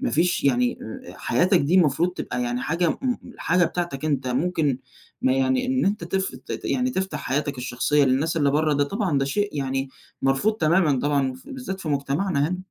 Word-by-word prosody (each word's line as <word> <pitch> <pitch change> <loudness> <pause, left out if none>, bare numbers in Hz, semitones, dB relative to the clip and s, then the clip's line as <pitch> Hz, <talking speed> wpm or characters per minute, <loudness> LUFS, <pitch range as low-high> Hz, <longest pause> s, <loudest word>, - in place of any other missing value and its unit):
ما - - 0
فيش 170 0 +1
يعني 125 -2 +2 0.3
أ - - -8
أ - - -12
حياتك 180 +9 +3
دي 150 +6 +1
المفروض 170 0 +3
تبقى 125 -7 -3
يعني 120 +1 -2
حاجة 170 +2 +1
م - - -2
م 250 -2 0 0.2
حاجة 180 +1 +3
بتاعتك 165 -4 -3
أنت 135 -4 0
ممكن 145 0 0 0.4
ما 260 0 +3
يعني 260 -1 +1
إن 260 -3 +1
أنت 200 -3 0
تف 190 +2 -2 0.3
يعني 255 0 0
تفتح 190 -3 -2
حياتك 140 0 -2
الشخصية 130 +3 +1
للناس 140 +6 +1
اللي 145 -3 +3
برّه 155 +2 +2
ده 145 0 +2
طبعًا 185 -3 0
ده 135 - +1
شيء 205 +9 0
يعني 135 0 -1 0.3
مرفوض 135 +11 +2
تمامًا 160 -5 +3
طبعًا، 140 -1 +1
ف 265 - -15
بالذات 250 -9 -6
في 160 - -5
مجتمعنا 145 +2 0
هنا. 180 - -3
155 Hz, 200 wpm, -24 LUFS, 135-190 Hz, 0.4 s, حياتك